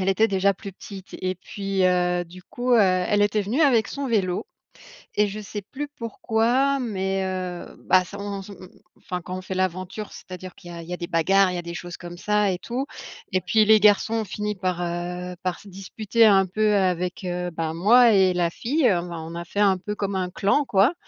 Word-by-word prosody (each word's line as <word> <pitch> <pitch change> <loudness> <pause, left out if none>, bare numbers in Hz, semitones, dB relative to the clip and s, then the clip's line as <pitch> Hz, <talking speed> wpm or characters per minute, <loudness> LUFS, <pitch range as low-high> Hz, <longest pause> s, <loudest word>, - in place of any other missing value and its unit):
elle 190 - 0
était 220 +4 +3
déjà 200 0 +2
plus 195 - -8
petite 190 0 -11
et 185 0 -2
puis, 195 +1 -2
heu, 180 -1 +2
du 180 +2 -13
coup, 245 +4 -2
heu, 235 - +6
elle 190 +1 +3
était 205 +1 +2
venue 225 +10 0
avec 245 -7 +4
son 280 -1 -4
vélo 195 - 0 0.7
et 210 0 +3
je 205 +2 -6
sais 205 0 -6
plus 275 +9 -6
pourquoi 235 +4 +1
mais 195 -5 -2
heu, 185 -2 -4 0.2
bah, 185 0 +5
s'en 200 +1 -6
s 195 - -12
m 200 - -9
m 185 - -11 0.3
enfin, 180 -1 -5
quand 185 +2 -6
on - - -6
fait 185 0 -6
l'aventure, 185 +3 -3
c'est-à-dire 185 0 -10
qu'il 175 -2 -12
y - - -8
a 170 - -7
il 165 - -12
y - - -3
a - - -3
des 175 - -4
bagarres, 185 +3 +3
il - - -4
y - - -2
a - - -3
des 170 0 -7
choses 175 0 -7
comme 175 0 -9
ça 210 +1 +1
et 180 - -2
tout 245 +8 -4 0.5
et 185 - +1
puis 215 +4 +3
les 215 0 +6
garçons 210 +1 +4
ont 225 - 0
fini 210 +2 -3
par, 185 -2 -2
heu, 180 +1 -4
par 185 -1 -2
se 205 - -15
disputer 205 +4 +1
un 195 -3 +5
peu 210 +3 +1
avec, 180 -1 0
heu, 180 0 -3
bah, 160 -1 -3
moi 230 +7 +6
et 190 -2 +4
la 175 -1 +1
fille, 260 - 0
heu, 180 -4 +2
bah, 170 -1 -6
on 160 +1 -7
a 170 - -4
fait 200 - -5
un 195 -2 +4
peu 210 +3 -5
comme 200 -1 -3
un 185 -1 -1
clan, 200 +12 +2
quoi 205 - +3
190 Hz, 235 wpm, -24 LUFS, 180-210 Hz, 0.7 s, heu